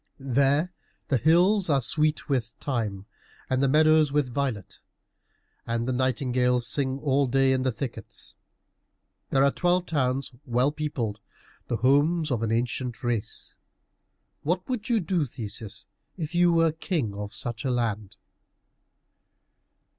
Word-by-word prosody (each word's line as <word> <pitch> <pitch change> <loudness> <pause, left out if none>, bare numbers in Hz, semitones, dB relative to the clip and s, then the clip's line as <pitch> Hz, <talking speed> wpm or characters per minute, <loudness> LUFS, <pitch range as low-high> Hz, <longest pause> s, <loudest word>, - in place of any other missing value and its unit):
There 140 +6 +3 0.4
the 135 - +3
hills 175 - +4
are 140 -2 +4
sweet 150 +4 0
with 120 -5 -1
thyme, 105 -8 -3 0.5
and 130 0 +2
the 140 - +3
meadows 155 0 +4
with 140 -4 0
violet, 130 -8 -3 0.9
and 115 +1 -1
the 130 - 0
nightingales 125 -1 +1
sing 135 +1 0
all 140 -1 +1
day 135 +1 +3
in 130 - +1
the 130 0 +1
thickets. 125 +1 -7 1.0
There 135 0 +3
are 140 - +4
twelve 180 +2 +1
towns 135 -5 -1
well 125 +2 +1
peopled, 135 -9 -3 0.5
the 120 - -1
homes 145 +6 +2
of 120 -3 0
an 115 -1 -1
ancient 120 +1 -2
race. 120 -4 -3 0.9
What 180 +4 -1
would 250 -2 -3
you 235 -2 +3
do, 175 -2 0
Theseus, 110 -3 -7 0.3
if 155 -2 -4
you 175 0 +4
were 165 -1 +3
king 155 - -2
of 105 0 -6
such 120 +1 -4
a 135 - -1
land?" 110 -4 -2
135 Hz, 140 wpm, -26 LUFS, 120-155 Hz, 1.0 s, hills